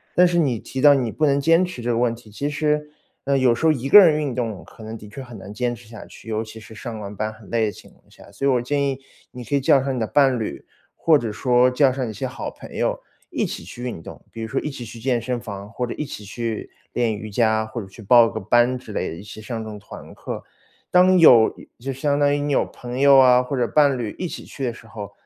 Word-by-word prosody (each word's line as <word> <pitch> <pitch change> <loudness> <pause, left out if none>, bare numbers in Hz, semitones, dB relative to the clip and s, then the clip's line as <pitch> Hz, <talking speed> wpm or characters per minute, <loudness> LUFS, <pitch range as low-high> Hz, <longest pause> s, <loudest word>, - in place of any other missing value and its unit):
但 180 0 +6
是 175 0 0
你 135 -9 +1
提 130 - -6
到 145 0 +8
你 125 -5 0
不 155 - 0
能 140 -1 +3
坚 165 +5 +4
持 180 -9 -5
这 120 - -3
个 115 - 0
问 120 -1 +2
题， 115 -2 -16
其 140 +7 -3
实， 150 0 -1 0.4
呃， 140 0 +2
有 130 -3 +4
时 160 - -3
候 160 - +6
一 135 -3 -2
个 210 - +11
人 160 -6 +6
运 140 -4 -2
动， 115 -6 -3
可 110 - -14
能 110 +1 -7
的 105 -1 -12
确 125 +6 -8
很 120 -3 -11
难 100 +1 -10
坚 120 +2 -1
持 115 -1 -16
下 115 0 -10
去， - - -15
尤 110 0 -1
其 110 0 -11
是 110 0 -13
上 110 0 -7
完 105 0 -7
班 110 +2 -3
很 110 -2 -16
累 115 -1 +1
的 105 - -1
情 90 - -15
况 - - -28
下。 - - -17
所 100 +7 -4
以 - - +4
我 125 -2 +2
建 140 +4 -1
议 135 -1 -3 0.3
你 125 -1 -9
可 140 - -1
以 - - +3
叫 135 +1 +4
上 135 0 -1
你 - - -2
的 110 - -1
伴 135 -2 +3
侣， 110 - -5 0.3
或 160 -2 +4
者 115 -5 -3
说 125 +3 +3
叫 130 +1 +3
上 130 -1 -3
一 - - -6
些 - - -4
好 - - -5
朋 - - -13
友 - - 0 0.3
一 - - -1
起 - - -6
去 120 +7 -9
运 120 -9 -5
动， - - -11
比 115 - -8
如 110 - -3
说 - - -5
一 - - -3
起 130 -4 -7
去 115 +1 -10
健 120 -1 0
身 125 +2 -2
房， 100 -4 -8
或 125 +3 -3
者 120 - -5
一 150 - -3
起 105 - -8
去 115 +2 -5 0.2
练 120 -2 +1
瑜 110 +1 -7
伽， 110 0 +1
或 110 +2 -6
者 100 - -10
去 95 - -13
报 115 +2 +6
个 - - -5
班 120 +1 +2
之 - - -11
类 - - -2
的， 80 - -6
一 - - -9
起 105 +1 -10
上 115 +1 -5
这 - - -7
种 105 - -7
团 105 - -12
课。 - - -6 0.5
当 185 0 +5
有 120 -9 +7 0.2
就 135 +3 -5
相 140 +2 0
当 145 0 +3
于 145 - 0
你 145 0 -1
有 - - +2
朋 125 +1 -7
友 140 0 +7
啊， 125 -1 +6
或 135 +2 -4
者 120 -2 +1
伴 145 -1 +3
侣 115 -4 -4
一 180 - -3
起 - - -8
去 140 - -8
的 125 - 0
时 115 - -15
候， 105 -3 -8
120 Hz, 310 characters per minute, -22 LUFS, 110-140 Hz, 0.5 s, 个